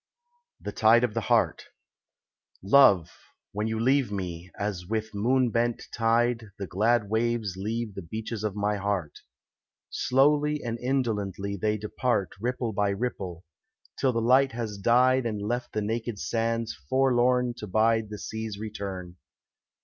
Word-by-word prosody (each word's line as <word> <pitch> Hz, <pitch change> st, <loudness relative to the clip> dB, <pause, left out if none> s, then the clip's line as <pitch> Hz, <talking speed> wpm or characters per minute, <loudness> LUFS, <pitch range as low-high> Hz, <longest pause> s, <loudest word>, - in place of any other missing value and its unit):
THE -, -, -5 dB
TIDE 115 Hz, +2 st, +5 dB
OF 120 Hz, -3 st, 0 dB
THE 115 Hz, -, -1 dB
HEART -, -, +1 dB, 1.0 s
Love, 100 Hz, -, +5 dB, 0.4 s
when 105 Hz, +2 st, -2 dB
you 110 Hz, 0 st, -2 dB
leave 130 Hz, 0 st, +2 dB
me, 90 Hz, -3 st, -5 dB
as 100 Hz, -4 st, -3 dB
with 110 Hz, +1 st, -3 dB
moon 125 Hz, +4 st, +2 dB
bent 120 Hz, +1 st, 0 dB
tide 115 Hz, 0 st, +1 dB
The 100 Hz, -, -4 dB
glad 110 Hz, +4 st, +1 dB
waves 110 Hz, -2 st, 0 dB
leave 110 Hz, +3 st, -3 dB
the 95 Hz, -, -6 dB
beaches 110 Hz, +5 st, -5 dB
of 105 Hz, -2 st, -2 dB
my 105 Hz, 0 st, 0 dB
heart; 100 Hz, -6 st, -2 dB, 0.7 s
Slowly 150 Hz, +3 st, +2 dB
and 115 Hz, -1 st, -3 dB
indolently 105 Hz, -7 st, -1 dB
they 105 Hz, +2 st, 0 dB
depart 105 Hz, 0 st, -1 dB
Ripple 120 Hz, -1 st, -2 dB
by 100 Hz, 0 st, +1 dB
ripple, 100 Hz, -5 st, -4 dB, 0.5 s
till 130 Hz, -, +3 dB
the 115 Hz, -1 st, -1 dB
light 130 Hz, +3 st, +4 dB
has 110 Hz, -4 st, -4 dB
died 125 Hz, +4 st, +4 dB
And 105 Hz, -2 st, -3 dB
left 120 Hz, +4 st, -3 dB
the 105 Hz, -, -2 dB
naked 115 Hz, +1 st, -3 dB
sands 115 Hz, +1 st, -1 dB, 0.2 s
forlorn 125 Hz, -1 st, +3 dB
to 105 Hz, -, -7 dB
bide 110 Hz, +2 st, +2 dB
The 105 Hz, -, -6 dB
sea's 110 Hz, 0 st, -5 dB
return. 100 Hz, -4 st, -6 dB
110 Hz, 145 wpm, -27 LUFS, 100-120 Hz, 1.0 s, TIDE